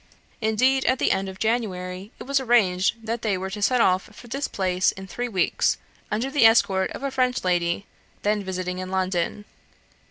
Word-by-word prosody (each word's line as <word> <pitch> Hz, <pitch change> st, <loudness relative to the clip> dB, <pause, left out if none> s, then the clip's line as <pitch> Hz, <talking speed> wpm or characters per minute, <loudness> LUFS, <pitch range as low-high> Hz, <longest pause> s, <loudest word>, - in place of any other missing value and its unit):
Indeed, 255 Hz, +5 st, +2 dB
at 260 Hz, -, +3 dB
the -, -, +2 dB
end 195 Hz, 0 st, 0 dB
of 190 Hz, -, -9 dB
January, 190 Hz, -3 st, -2 dB
it -, -, -8 dB
was 275 Hz, +1 st, +1 dB
arranged 225 Hz, -3 st, +2 dB
that 230 Hz, +1 st, -2 dB
they 205 Hz, -4 st, 0 dB
were 190 Hz, +1 st, -5 dB
to 210 Hz, -, -5 dB
set 245 Hz, +4 st, +3 dB
off 185 Hz, -2 st, +2 dB
for 240 Hz, -, -13 dB
this 275 Hz, +5 st, -2 dB
place 185 Hz, -1 st, +1 dB
in 190 Hz, -, -9 dB
three 240 Hz, +7 st, -4 dB
weeks, 185 Hz, -5 st, +1 dB, 0.3 s
under 235 Hz, +6 st, -1 dB
the 275 Hz, -6 st, +6 dB
escort 195 Hz, -4 st, +3 dB
of -, -, -8 dB
a 275 Hz, -, -1 dB
French 255 Hz, -1 st, 0 dB
lady, 175 Hz, +1 st, 0 dB, 0.4 s
then 210 Hz, 0 st, +1 dB
visiting 185 Hz, -1 st, -3 dB
in 185 Hz, 0 st, -5 dB
London. 185 Hz, +1 st, -1 dB
205 Hz, 190 wpm, -24 LUFS, 185-240 Hz, 0.4 s, the